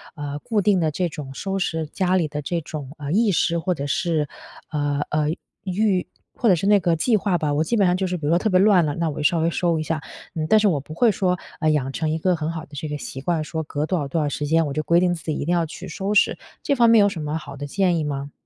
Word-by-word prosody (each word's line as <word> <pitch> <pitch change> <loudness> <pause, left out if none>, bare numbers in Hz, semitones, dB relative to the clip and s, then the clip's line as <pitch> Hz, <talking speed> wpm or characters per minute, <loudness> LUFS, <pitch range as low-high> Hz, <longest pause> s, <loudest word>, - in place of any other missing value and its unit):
呃， 145 -2 -5
固 215 +5 0
定 195 -1 +3
的 160 -2 +1
这 175 +3 -1
种 145 -4 -7
收 195 +7 -3
拾 160 -3 -1
家 185 +3 0
里 175 -4 +2
的 150 0 -4
这 170 +4 -2
种， 145 -3 -7
呃， 145 -1 -5
意 215 +3 +3
识， 170 -1 +1
或 180 +2 0
者 140 -4 -4
是， 155 0 0 0.4
呃 145 -2 -1
呃， 150 0 +1 0.4
预 190 0 +1 0.3
或 235 - +2
者 185 - +6
是 185 +4 -2
那 205 0 +6
个 170 -2 +1
计 220 +9 +2
划 195 -3 +1
吧。 150 -3 -1
我 150 +2 +2
基 235 - -1
本 200 - +4
上 180 - +3
就 190 0 -1
是 180 0 -2
比 155 - -6
如 150 - +1
说 170 - +5
特 215 - 0
别 185 -2 +4
乱 195 -4 +5
了， 145 -1 -2
那 165 -1 0
我 145 - -6
就 150 - -3
稍 165 +3 +3
微 165 +1 +2
收 170 -1 0
一 - - -2
下。 155 0 -2 0.3
嗯， 155 -1 -1
但 215 - +6
是 210 - +3
我 165 -7 +2
不 145 +3 -10
会 225 +7 +4
说， 180 -2 0 0.2
呃， 155 - +2
养 135 -3 0
成 160 +1 -1
一 155 - 0
个 180 +2 +2
很 155 0 -3
好 165 -1 -5
的 - - -30
这 145 +2 -4
个 150 - -3
习 135 -2 -7
惯， 165 +1 0
说 160 +2 -4
隔 150 0 -3
多 180 +3 0
少 145 - -3
多 165 +4 -1
少 150 - 0
时 145 +1 -3
间， 165 +2 +3
我 140 - -4
就 155 - -1
规 170 +2 +4
定 180 0 +2
自 165 - -7
己 155 - -1
一 - - -3
定 175 - +1
要 170 -1 +2
去 170 +4 -9
收 195 +4 -3
拾。 210 - +4 0.3
这 280 - +1
方 235 -3 +5
面 230 -1 +7
有 205 - +6
什 185 -5 -4
么 150 +1 -2
好 145 -3 -8
的 145 +1 -6
建 180 +2 +1
议 160 - -1
吗？ 140 -1 -4
165 Hz, 330 characters per minute, -23 LUFS, 150-185 Hz, 0.4 s, 面